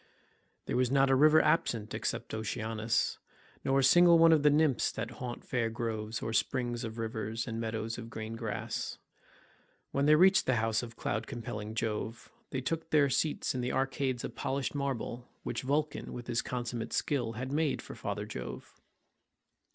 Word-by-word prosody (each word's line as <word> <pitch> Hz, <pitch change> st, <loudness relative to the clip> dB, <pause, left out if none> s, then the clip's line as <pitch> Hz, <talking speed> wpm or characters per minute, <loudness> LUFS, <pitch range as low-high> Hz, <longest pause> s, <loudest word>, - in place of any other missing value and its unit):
There -, -, -2 dB
was 125 Hz, -1 st, +2 dB
not 135 Hz, 0 st, +4 dB
a -, -, +6 dB
river 155 Hz, +3 st, +7 dB
absent 110 Hz, -9 st, +1 dB
except -, -, -3 dB
Oceanus, 110 Hz, 0 st, -1 dB, 0.4 s
nor 135 Hz, 0 st, +2 dB
a 135 Hz, -, +3 dB
single 175 Hz, +5 st, +7 dB
one 165 Hz, 0 st, +7 dB
of 160 Hz, -2 st, +5 dB
the 150 Hz, -, +6 dB
nymphs 150 Hz, -3 st, +3 dB
that 115 Hz, -, -4 dB
haunt 120 Hz, -1 st, -5 dB
fair 120 Hz, -2 st, 0 dB
groves, 110 Hz, -1 st, -3 dB
or 110 Hz, -, -2 dB
springs 120 Hz, +1 st, 0 dB
of 110 Hz, 0 st, -5 dB
rivers 110 Hz, 0 st, -3 dB
and 115 Hz, 0 st, -3 dB
meadows 115 Hz, +1 st, -3 dB
of 115 Hz, -1 st, -8 dB
green 110 Hz, 0 st, -6 dB
grass. 115 Hz, -3 st, -4 dB, 0.9 s
When 140 Hz, +1 st, +1 dB
they 155 Hz, -, +7 dB
reached 190 Hz, +5 st, +5 dB
the 130 Hz, -, +3 dB
house 110 Hz, -1 st, +1 dB
of 115 Hz, -2 st, -8 dB
cloud 110 Hz, 0 st, -2 dB
compelling 110 Hz, -4 st, -5 dB
Jove, 110 Hz, +1 st, -3 dB, 0.2 s
they 130 Hz, -, -2 dB
took 160 Hz, +4 st, -3 dB
their 145 Hz, -3 st, +4 dB
seats 155 Hz, +2 st, 0 dB
in 125 Hz, -, -2 dB
the 125 Hz, -, -2 dB
arcades 135 Hz, -1 st, 0 dB
of -, -, -5 dB
polished 135 Hz, 0 st, -2 dB
marble 130 Hz, -3 st, -3 dB
which 115 Hz, 0 st, -3 dB
Vulcan 145 Hz, +3 st, -1 dB
with 120 Hz, -1 st, -6 dB
his 120 Hz, -1 st, 0 dB
consummate 120 Hz, -2 st, -4 dB
skill 125 Hz, -6 st, 0 dB
had 130 Hz, +4 st, -5 dB
made 150 Hz, 0 st, +1 dB
for -, -, -8 dB
father -, -, -4 dB
Jove. 65 Hz, 0 st, -8 dB
120 Hz, 175 wpm, -31 LUFS, 115-140 Hz, 0.9 s, river